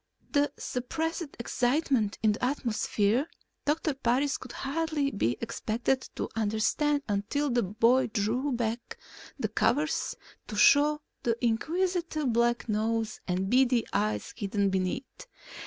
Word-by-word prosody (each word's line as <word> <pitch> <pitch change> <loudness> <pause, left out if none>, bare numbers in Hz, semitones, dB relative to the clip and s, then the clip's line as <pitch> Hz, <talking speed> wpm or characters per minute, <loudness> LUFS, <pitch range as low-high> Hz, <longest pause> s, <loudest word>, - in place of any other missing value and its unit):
The 290 -2 +2
suppressed 320 +5 -3
excitement 245 -2 +1
in 215 - +5
the 210 - -4
atmosphere 240 -1 +1 0.4
Doctor 305 +1 +1
Parris 270 +2 +1
could 255 - -9
hardly 295 0 -1
be 125 - 0
expected 230 +3 -1
to - - -2
understand 225 +7 +1
until 225 +8 0
the 240 0 +3
boy 230 +6 +3
drew 235 +6 0
back 235 -1 -2 0.4
the - - 0
covers 300 +4 +1 0.3
to 215 - -6
show 295 +8 +5 0.2
the 230 -1 0
inquisitive 320 - 0
black 240 +1 +2
nose 220 0 -1
and 185 +1 0
beady 250 0 +3
eyes 210 +1 -1
hidden 200 -2 0
beneath. 190 - -3
240 Hz, 125 wpm, -29 LUFS, 215-285 Hz, 0.4 s, in